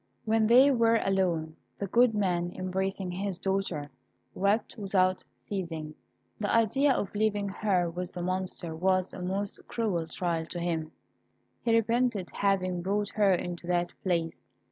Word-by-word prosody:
When 220 Hz, 0 st, +3 dB
they 255 Hz, +5 st, +7 dB
were 230 Hz, -2 st, +4 dB
alone, 175 Hz, -5 st, 0 dB, 0.2 s
the 200 Hz, -, -2 dB
good 235 Hz, +3 st, +4 dB
man, 175 Hz, -4 st, 0 dB
embracing 190 Hz, 0 st, -2 dB
his 190 Hz, 0 st, -3 dB
daughter, 190 Hz, -7 st, -2 dB, 0.4 s
wept 200 Hz, +4 st, +1 dB
without 190 Hz, -3 st, +1 dB, 0.2 s
ceasing. 165 Hz, -6 st, -4 dB, 0.5 s
The 205 Hz, -1 st, -1 dB
idea 230 Hz, +6 st, +3 dB
of 205 Hz, -, -2 dB
leaving 205 Hz, -1 st, 0 dB
her 190 Hz, -3 st, +1 dB
with 180 Hz, +2 st, -5 dB
the 175 Hz, -, -4 dB
Monster 185 Hz, -2 st, -3 dB
was 185 Hz, +2 st, +1 dB
a 185 Hz, -, -7 dB
most 195 Hz, +3 st, -2 dB
cruel 190 Hz, -8 st, -1 dB
trial 165 Hz, -1 st, -2 dB
to 175 Hz, -, -5 dB
him. 165 Hz, -2 st, -2 dB, 0.7 s
He 230 Hz, -1 st, +2 dB
repented 230 Hz, -3 st, +1 dB
having 185 Hz, -3 st, 0 dB
brought 205 Hz, +3 st, 0 dB
her 205 Hz, -2 st, +3 dB
into 175 Hz, -1 st, -2 dB
that 175 Hz, 0 st, 0 dB
place. 170 Hz, -3 st, -2 dB
190 Hz, 145 wpm, -29 LUFS, 175-210 Hz, 0.7 s, they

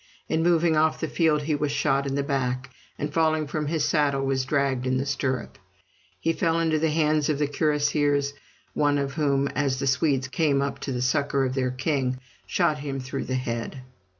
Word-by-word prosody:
In 160 Hz, -, 0 dB
moving 170 Hz, -1 st, +3 dB
off 155 Hz, 0 st, +2 dB
the 160 Hz, -, -2 dB
field 155 Hz, -2 st, +2 dB
he 155 Hz, +1 st, 0 dB
was 145 Hz, 0 st, 0 dB
shot 140 Hz, -1 st, +1 dB
in 135 Hz, -, -2 dB
the 140 Hz, -, 0 dB
back, 130 Hz, -2 st, -2 dB, 0.3 s
and 145 Hz, 0 st, -4 dB
falling 155 Hz, -1 st, +2 dB
from 150 Hz, +1 st, -3 dB
his 155 Hz, -1 st, 0 dB
saddle 140 Hz, -3 st, +1 dB
was 135 Hz, -1 st, 0 dB
dragged 135 Hz, -2 st, 0 dB
in 130 Hz, 0 st, +1 dB
the 135 Hz, -, -1 dB
stirrup. 130 Hz, -5 st, -2 dB, 0.6 s
He 165 Hz, -, +1 dB
fell 165 Hz, 0 st, +1 dB
into 160 Hz, -2 st, +1 dB
the 160 Hz, +1 st, +2 dB
hands 155 Hz, -1 st, +2 dB
of 150 Hz, -, +1 dB
the 150 Hz, -, +1 dB
cuirassiers, 145 Hz, -1 st, +1 dB, 0.4 s
one 145 Hz, -1 st, +2 dB
of 140 Hz, -1 st, -2 dB
whom, 140 Hz, -3 st, +1 dB
as 140 Hz, -3 st, 0 dB
the 140 Hz, -, -2 dB
Swedes 135 Hz, 0 st, +1 dB
came 140 Hz, 0 st, +1 dB
up 140 Hz, 0 st, -2 dB
to 135 Hz, -, -4 dB
the 125 Hz, -1 st, -1 dB
succor 140 Hz, +1 st, +1 dB
of 130 Hz, -, -2 dB
their 130 Hz, -1 st, 0 dB
king, 130 Hz, 0 st, -1 dB, 0.3 s
shot 165 Hz, -4 st, +1 dB
him 140 Hz, -1 st, -4 dB
through 130 Hz, +1 st, -4 dB
the 130 Hz, -, -2 dB
head. 125 Hz, +1 st, -4 dB
140 Hz, 205 wpm, -25 LUFS, 135-155 Hz, 0.6 s, moving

